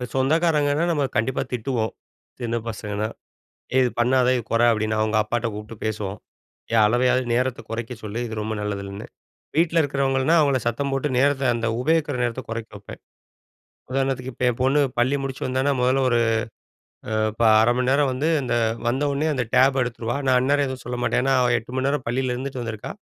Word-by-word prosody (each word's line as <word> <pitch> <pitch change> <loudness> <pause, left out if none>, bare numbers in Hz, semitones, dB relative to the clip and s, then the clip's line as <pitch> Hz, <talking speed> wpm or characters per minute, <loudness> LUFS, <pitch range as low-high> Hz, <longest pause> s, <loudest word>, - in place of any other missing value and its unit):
சொந்தக்காரங்கன்னா, 150 +2 +2
நம்ம 145 -4 +1
கண்டிப்பா 130 +4 0
திட்டுவோம், 120 -2 -1 0.5
சின்ன 120 -1 -2
பசங்கன்னா. 105 -1 -3 0.7
"இது 130 - +4
பண்ணாத, 125 +1 +3
இது 120 - -2
கொற" 115 +1 +2
அப்படின்னு 110 0 -1
அவங்க 110 0 +1
அப்பாட்ட 115 +2 -2
கூப்புட்டு 105 +2 -8
பேசுவோம். 105 -2 -3 0.5
ஏ! - - +1
அளவையாவது 125 +3 +2
நேரத்த 130 +1 0
குறைக்க 115 +2 -4
சொல்லு. 110 +1 -5
இது 110 - -6
ரொம்ப 110 +1 -3
நல்லதில்லன்னு. 100 -1 -5 0.5
வீட்ல 165 0 +3
இருக்கிறவங்கள்ன்னா, 135 +1 +1
அவங்கள 140 -3 +3
சத்தம் 140 +4 -1
போட்டு 135 +2 0
நேரத்த 140 0 +2
அந்த 115 0 -2
உபயோகிக்கிற 155 +1 +1
நேரத்த 120 +2 -2
கொறைக்க 115 0 -5
வைப்பேன். 100 0 -11 0.9
உதாரணத்துக்கு 130 -1 -1
இப்ப 125 - -3
என் 120 +1 -7
பொண்ணு 135 +3 +3 0.2
பள்ளி 130 +4 +2
முடிச்சு 135 -1 -5
வந்தான்னா, 130 +2 +1
முதல்ல 130 +2 +2
ஒரு 120 -1 +3 0.9
அ - - -5 0.2
இப்ப 115 - -2 0.2
0:30 115 +2 +4
மணி 125 0 +1
நேரம் 140 0 +3
வந்து, 135 +5 -1 0.2
இந்த 125 -1 -2 0.3
வந்த 130 +4 0
ஒன்னே 145 +3 0
அந்த 130 -3 0
டேப 135 +1 +5
எடுத்துருவா. 120 0 -3
நான் 130 -1 +5
அந்நேரம் 140 +3 +2
எதுவும் 130 -1 -6
சொல்ல 125 +1 -3
மாட்டேன். - - +1
ஏன்னா, 135 - +2
அவ 125 -1 +2
8 115 +2 -8
மணி 130 +1 0
நேரம் 140 -2 -1
பள்ளியில 125 +1 0
இருந்துட்டு 130 0 -5
வந்துருக்கா. 110 -3 -5
125 Hz, 175 wpm, -23 LUFS, 115-135 Hz, 0.9 s, டேப